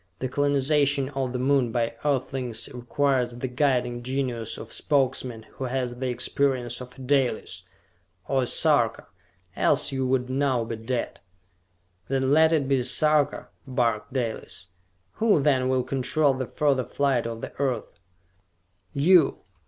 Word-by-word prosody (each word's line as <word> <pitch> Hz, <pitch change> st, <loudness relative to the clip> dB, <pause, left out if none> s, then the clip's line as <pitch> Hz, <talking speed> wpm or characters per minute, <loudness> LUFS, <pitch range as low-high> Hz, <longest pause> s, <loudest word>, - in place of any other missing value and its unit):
"The 130 Hz, -, -3 dB
colonization 140 Hz, 0 st, +2 dB
of 135 Hz, -3 st, -3 dB
the 125 Hz, -, -2 dB
Moon 130 Hz, -2 st, +2 dB
by 115 Hz, -1 st, 0 dB
Earthlings 130 Hz, -4 st, -1 dB
requires 125 Hz, 0 st, 0 dB
the 125 Hz, +2 st, -4 dB
guiding 125 Hz, -2 st, 0 dB
genius 125 Hz, -3 st, -3 dB
of -, -, -9 dB
a -, -, -4 dB
Spokesman 130 Hz, -5 st, 0 dB
who 135 Hz, -, -6 dB
has 125 Hz, -1 st, -2 dB
the 130 Hz, +1 st, -3 dB
experience 125 Hz, 0 st, -1 dB
of 125 Hz, +1 st, -11 dB
a -, -, -11 dB
Dalis 130 Hz, -3 st, 0 dB, 0.7 s
or 135 Hz, -1 st, +1 dB
a 125 Hz, -, -1 dB
Sarka, 130 Hz, -8 st, +2 dB, 0.5 s
else -, -, +2 dB
you 130 Hz, -1 st, -1 dB
would 130 Hz, -1 st, +1 dB
now 130 Hz, -2 st, +1 dB
be 115 Hz, 0 st, -4 dB
dead!" 120 Hz, +2 st, -3 dB, 0.9 s
"Then 135 Hz, 0 st, 0 dB
let 160 Hz, +2 st, +5 dB
it 150 Hz, -4 st, +1 dB
be 135 Hz, -1 st, +2 dB
a -, -, -1 dB
Sarka!" 150 Hz, +3 st, +2 dB, 0.2 s
barked 120 Hz, -3 st, 0 dB
Dalis. 115 Hz, -7 st, -4 dB, 0.5 s
"Who, 215 Hz, -7 st, +3 dB
then, 135 Hz, -3 st, +2 dB
will 130 Hz, -1 st, +1 dB
control 135 Hz, +3 st, +1 dB
the 130 Hz, -1 st, -4 dB
further 140 Hz, -4 st, +1 dB
flight 135 Hz, -3 st, 0 dB
of 115 Hz, 0 st, -6 dB
the -, -, -7 dB
Earth?" 125 Hz, -10 st, -2 dB, 0.9 s
"You! 165 Hz, +3 st, +4 dB
130 Hz, 150 wpm, -25 LUFS, 125-140 Hz, 0.9 s, let